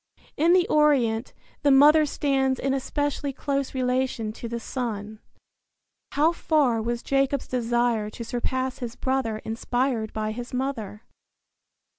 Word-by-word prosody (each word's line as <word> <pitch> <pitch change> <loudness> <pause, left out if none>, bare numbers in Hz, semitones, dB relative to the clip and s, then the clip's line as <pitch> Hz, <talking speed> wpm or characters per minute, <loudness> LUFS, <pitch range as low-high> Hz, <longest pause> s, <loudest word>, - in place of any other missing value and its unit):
In 330 +4 +4
the 365 -1 +4
Orient 260 -7 +2 0.3
the 290 - +3
mother 300 +3 +6
stands 270 -2 0
in 270 0 0
especially 285 +1 -2
close 275 0 -2
relation 250 -3 -1
to 235 - -7
the 235 0 -4
son. 220 -4 -5 0.9
How 310 +3 +4
far 290 -9 +1
was 235 +1 -3
Jacob's 275 0 0
desire 240 -3 0
to 235 - -7
surpass 255 +2 -2
his 240 -3 -5
brother 260 -5 -1
inspired 235 0 -1
by 215 0 -2
his 245 +3 -6
mother? 235 -5 -3
255 Hz, 130 wpm, -25 LUFS, 230-275 Hz, 0.9 s, mother